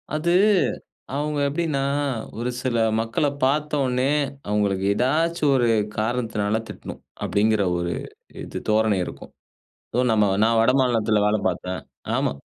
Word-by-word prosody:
அது 170 +3 0 0.8
அவுங்க 150 +1 -1
எப்டின்னா, 155 -2 -1 0.6
ஒரு 120 +1 -1
சில 125 -3 0 0.2
மக்கள 115 +6 0 0.2
பாத்தோன்னே, 135 -2 +1 0.4
அவுங்களுக்கு 100 -2 0
ஏதாச்சும் 155 +5 +1
ஒரு 120 -2 +2 0.3
காரணத்தினால 110 -2 -1
திட்டணும். - - -9 0.2
அப்படிங்கிற 105 0 +2 0.2
ஒரு 85 0 -2 0.5
இது - - -6
தோரணை 110 -2 +3
இருக்கும். - - -10 0.6
ஸோ - - +2
நம்ம 105 -1 +4 0.2
நான் 115 +1 +3
வடமாநிலத்தில 115 -4 +2
வேலை 105 +1 +2
பாத்தேன் 90 0 -4 0.4
ஆமா. - - +1
120 Hz, 115 wpm, -23 LUFS, 105-140 Hz, 0.8 s, நம்ம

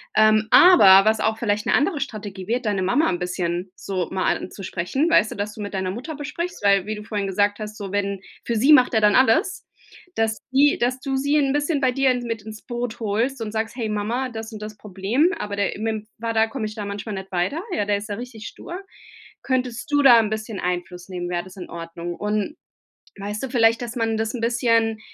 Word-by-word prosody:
ähm 215 0 +4
aber 195 - +8
was 220 0 +1
auch 220 0 +1
vielleicht 210 -2 0
'ne - - +1
andere 295 +3 +2
Strategie 205 -8 -6
wäre, 240 +3 0
deine 205 -5 -1
Mama 240 - +2
'n 175 -2 -2
bisschen 180 0 -3
so 185 -3 -3
mal 190 -1 +1
anzusprechen, 195 - -2
weißt 220 -10 +4
du, - - -6
dass 205 +1 -4
du 215 - -8
mit 205 0 -6
deiner 190 -1 -2
Mutter 260 - -6
besprichst 335 - -5
weil 200 -2 +4
wie 215 +1 -3
du 210 - -8
vorhin 210 -2 -3
gesagt 205 +2 +1
hast, 215 0 -7
so 200 -3 -6
wenn 200 -1 -1 0.2
für 235 - -2
sie 265 +8 +5
macht 255 -4 +5
er 220 - +3
dann 210 -1 +4
alles, 260 - +3 0.5
dass 220 -1 0
die 280 +2 +4
dass 250 +2 0
du 270 0 -3
sie 285 +3 +1
'n 275 -2 +2
bisschen 290 +1 0
bei 260 -2 +2
dir 270 +1 +2
mit 230 -2 -4
ins 215 0 -10
Boot 240 -2 -4
holst 230 +5 -1
und 215 -1 -4
sagst: 220 +1 -3
„Hey 235 -3 -2
Mama, 225 +5 -2
das 225 -1 -7
und 215 -1 -9
das 215 0 -7
Problem, 210 - 0
aber 205 -1 -4
der 200 -1 -1
im 210 - -6
mitm 220 -1 -3
Vater 225 0 +1
komme 225 -1 -4
ich 215 - -5
da 210 -2 -5
manchmal 200 +2 -5
nicht 190 0 -8
weiter, 185 - -1
ja, 210 - 0
der 205 0 +1
ist 205 +2 -8
da 205 - -2
richtig 230 -1 -8
stur. 350 +2 -8 0.6
Könntest 255 -1 -2
du 290 0 +4
da 260 -4 +8
'n 215 -2 0
bisschen 220 -2 -4
Einfluss 180 0 -4
nehmen? 180 -2 -5
Wäre 175 -1 -2
das 185 0 -13
in 180 - -8
Ordnung?“ 170 +1 -6
Und, 210 - -2 0.6
weißt 205 +1 -5
du, - - -3
vielleicht 230 -1 +3
dass 240 +1 -6
man 225 -1 0
das 220 +1 -2
'n 245 - -4
bisschen 230 -2 +1
220 Hz, 230 wpm, -23 LUFS, 200-245 Hz, 0.6 s, aber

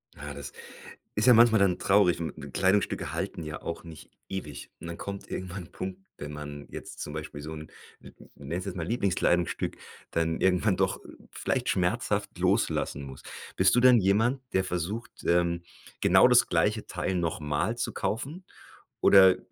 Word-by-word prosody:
Ja, 70 +1 -7
das 70 0 -7 0.6
ist 105 - +1
ja 125 - +8
manchmal 115 -1 +6
dann 95 -3 +3
traurig 95 -3 +3
we 85 -1 -3
m - - -10
Kleidungsstücke 95 +1 +1
halten - - -4
ja 75 -1 -6
auch 85 - -6
nicht 80 -2 -12 0.2
ewig 85 -7 -6
und - - -8
dann 85 0 -6
kommt 100 0 -7
irgendwann 95 0 -5
'n - - -19
Punkt, 95 0 -6 0.2
wenn 75 +1 -7
man 75 -1 -8
jetzt - - -9
zum 75 - -5
Beispiel 75 -1 -6
so 80 +2 -6
'n 75 0 -8 0.3
'n - - -17
ich - - -16 0.2
nenne 70 +3 -6
es 90 - -4
jetzt 95 -1 -5
mal 85 -3 -3
Lieblingskleidungsstück, 90 -5 0 0.3
dann 80 0 0
irgendwann 95 +2 +2
doch - - 0 0.3
vielleicht - - -2
schmerzhaft - - 0
loslassen 70 - 0
muss. 65 0 -10 0.3
Bist 95 +2 +4
du 120 - +4
dann 125 -1 +7
jemand, 110 +7 +2
der 95 - +2
versucht, 90 +6 -3
ähm, 85 0 +2 0.4
genau - - +6
das - - +6
gleiche - - +1
Teil 95 - -2
noch 85 +1 -1
mal 75 +10 -1
zu - - -2
kaufen, 140 - -3 0.6
oder 95 -1 +7
90 Hz, 180 wpm, -28 LUFS, 80-100 Hz, 0.6 s, ja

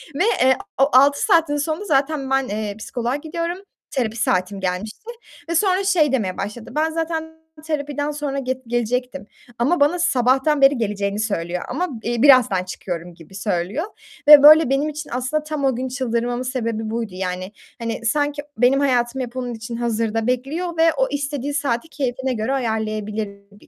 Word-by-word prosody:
ve 355 - +1 0.2
eee, 260 0 +4 0.2
o 275 - +5
6 280 +2 +5
saatin 320 -3 +3
sonunda 315 +7 -2
zaten 275 -3 0
ben, 270 -1 +1
eee, 210 0 -4
psikoloğa 240 +3 -3
gidiyorum, 335 +3 -4 0.3
terapi 235 -4 -2
saatim 185 -2 0
gelmişti 190 - -4 0.4
ve 335 - -1
sonra 375 +2 +2
şey 350 -8 +3
demeye 205 -9 -1
başladı, 210 +4 -6
ben 315 +1 +1
zaten 320 0 -4 0.2
terapiden 290 -1 -2
sonra 290 -2 -3
get 260 -1 -3
gelecektim 245 +1 -2 0.3
ama 285 +8 +2
bana 295 +5 +3
sabahtan 270 -1 +2
beri 275 0 +6
geleceğini 205 -2 -2
söylüyor 180 -5 -2
ama, 355 +8 -2
iii, 240 +1 -1
birazdan 250 -10 +6
çıkıyorum 175 -1 -6
gibi 170 +3 -15
söylüyor 195 - -2 0.4
ve 295 -1 +10
böyle 310 -1 +8
benim 275 +3 +1
için 300 0 -7
aslında 255 +5 -1
tam 300 -2 -3
o 265 - +2
gün 255 +2 -3
çıldırmamın 245 -1 -2
sebebi 230 -4 -3
buydu. 225 -2 -3
Yani, 185 +1 -4 0.3
hani 230 0 -4
sanki 290 +4 0 0.2
benim 255 +3 +4
hayatım 255 -2 +1
hep 245 -1 -6
onun 245 -1 -3
için 225 +1 -7
hazırda 225 -1 -1
bekliyor 305 +8 -2
ve 325 0 +4
o - - +2
istediği 285 -1 -3
saati 280 -1 -1
keyfine 265 -3 -2
göre 225 +3 -2
ayarlayabilir 215 -4 -2 0.2
bir 205 - -20
255 Hz, 165 wpm, -21 LUFS, 220-295 Hz, 0.4 s, ve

